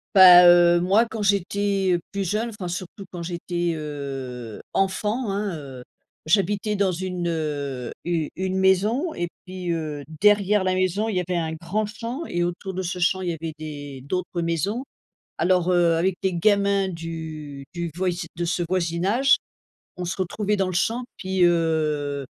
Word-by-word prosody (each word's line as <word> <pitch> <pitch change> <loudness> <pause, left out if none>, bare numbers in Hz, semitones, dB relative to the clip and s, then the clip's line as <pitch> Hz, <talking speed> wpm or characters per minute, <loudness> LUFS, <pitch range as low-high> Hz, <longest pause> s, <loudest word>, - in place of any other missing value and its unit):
Bah, 180 -2 +10
heu, 175 0 +6
moi, 195 +6 +4
quand 225 -1 -6
j'étais 200 -2 +1
plus 200 -1 -2
jeune, 215 +6 -1
enfin, 205 -5 -6
surtout 180 +3 -6
quand 175 - -6
j'étais, 175 0 -2
heu, 135 -6 -6
enfant, 210 +5 0
hein, 200 -2 -2
heu, 135 -4 -9 0.4
j'habitais 205 +4 +1
dans 200 -2 +2
une, 180 0 -3 0.8
u 165 -3 -1
une 190 +1 -2
maison 210 - +2
et 175 - -2 0.2
puis, 185 -1 -4
heu, 155 -3 -3 0.2
derrière 210 -1 +4
la 185 0 +1
maison, 185 +3 +1
il 215 - -2
y 180 - +2
avait 180 0 -2
un 160 -1 -2
grand 180 +7 -2
champ 235 +8 -5
et 175 - -1
autour 175 +2 -3
de 185 - -2
ce 180 +1 -3
champ, 190 +2 +2
il 180 - -2
y 170 - -1
avait 160 0 -5
des 145 -3 -7
d'autres 180 +2 -2
maisons. 170 - -1 0.5
Alors, 180 +1 +2
heu, 175 -2 +4
avec 180 +2 +1
des 190 -1 0
gamins 200 +1 +2
du 160 -4 -7
du 170 -1 -3
voisi 180 -2 -1
de 175 +1 -2
ce 175 +1 -1
voisinage, 185 +9 +2 0.6
on 180 - -5
se 175 - -3
retrouvait 205 +3 -1
dans 195 -1 +1
le 185 - -3
champ 230 +7 0
puis, 190 -1 0
heu, 155 -4 +1
180 Hz, 170 wpm, -24 LUFS, 165-200 Hz, 0.8 s, Bah